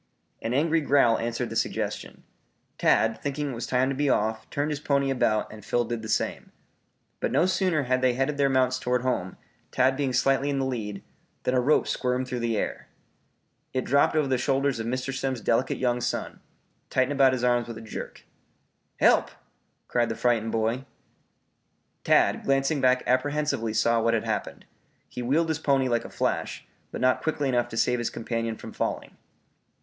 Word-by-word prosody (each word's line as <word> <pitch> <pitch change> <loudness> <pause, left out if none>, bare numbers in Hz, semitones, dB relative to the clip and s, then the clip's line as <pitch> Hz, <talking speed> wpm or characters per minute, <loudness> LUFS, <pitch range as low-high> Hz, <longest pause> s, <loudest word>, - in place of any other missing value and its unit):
An 115 - -3
angry 160 +3 +2
growl 140 -5 +3
answered 115 0 -3
the - - -5
suggestion. - - -3 0.6
Tad 110 0 +2
thinking 145 0 -2
it - - -5
was 115 - -5
time 130 0 +2
to 135 - -2
be 145 +1 +1
off, 110 -1 0
turned 145 +2 -1
his 145 - -3
pony 140 -2 +1
about 110 -5 0
and 105 -1 -11
Phil 120 +3 0
did 120 0 -4
the 110 - -7
same. - - -1 0.7
But - - -1
no 170 - +3
sooner 185 -5 +1
had 130 0 0
they 130 -1 +3
headed 135 +3 -1
their 140 -1 +3
mounts 130 -1 +2
toward 125 0 0
home, 110 -8 -2 0.3
Tad 130 +1 +2
being 135 -1 -1
slightly 135 +3 +2
in 140 - -1
the 135 - 0
lead, 105 -6 -4 0.4
than 125 - 0
a 125 - +3
rope 145 +5 +3
squirmed 125 0 -1
through 125 -1 -3
the 115 -2 -1
air. - - -3 0.9
It 130 -1 0
dropped 140 +3 +3
over 150 -2 +2
the 130 -2 +1
shoulders 135 0 +1
of 115 - -3
Mr. 130 +2 -2
Simms' 135 -2 -2
delicate 115 +3 0
young 125 -1 0
son, - - -3 0.5
tightened 130 +1 +1
about 135 -2 +4
his 125 -1 -2
arms 120 -1 +2
with 115 - -7
a - - -8
jerk. 110 - -8 0.8
"Help!" - - +4 0.6
cried 120 -1 +1
the 115 - -2
frightened 115 -2 +1
boy. 115 +3 0 1.2
Tad, - - +3
glancing 135 +2 +1
back 125 0 +3
apprehensively 130 -2 0
saw 115 +1 +3
what 115 +1 +2
had 110 - -1
happened. - - -3 0.4
He 125 - -7
wheeled 150 +7 +1
his 160 -1 -1
pony 135 -4 +2
like 120 -2 0
a - - -7
flash, - - -2 0.2
but - - -6
not 130 0 +3
quickly 150 -3 -1
enough 120 -1 +1
to 115 - -7
save 125 +1 +2
his 120 - -1
companion 115 -1 -3
from - - -10
falling. - - -3
130 Hz, 190 wpm, -26 LUFS, 120-140 Hz, 1.2 s, about